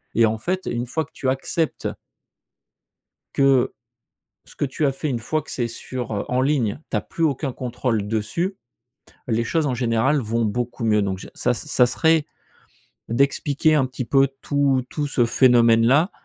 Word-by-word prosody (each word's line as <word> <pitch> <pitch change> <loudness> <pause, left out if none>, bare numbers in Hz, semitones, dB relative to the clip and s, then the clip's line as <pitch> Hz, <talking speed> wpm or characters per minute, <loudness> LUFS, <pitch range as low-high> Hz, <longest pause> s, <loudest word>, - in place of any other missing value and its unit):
et 115 - +5
en 110 0 0
fait 185 +9 -1
une 120 +1 -2
fois 160 +5 -2
que - - -29
tu 130 - -2
acceptes 150 +4 -1 1.5
que 135 -2 +3 0.7
ce - - -17
que - - -1
tu 145 +2 -1
as 135 - +3
fait, 140 +3 -4
une 125 -3 -1
fois 155 +7 -1
que - - -11
c'est 120 -2 -1
sur, 120 +1 -6
heu 100 - -2
en 125 +1 +1
ligne, 130 -5 0
tu - - 0
as - - -1
plus 165 - -4
aucun 140 -2 0
contrôle 120 -4 -2
dessus, 115 - -2 0.7
les 115 -1 +1
choses 160 +7 0
en 130 - -1
général 120 +4 +1
vont 115 -1 -1
beaucoup 120 +3 -3
mieux. 105 -2 +3
Donc 95 -2 -2
j - - -9
ça - - +1
ça 125 - +2
serait, 160 +4 +2 0.8
d'expliquer 140 +5 +2
un 135 -3 +3
petit 130 0 -5
peu 135 +2 +4
tout 140 -3 +1
tout 145 -1 -2
ce 125 -4 +2
phénomène 115 -2 +5
là, 145 - +4
130 Hz, 180 wpm, -22 LUFS, 115-145 Hz, 1.5 s, et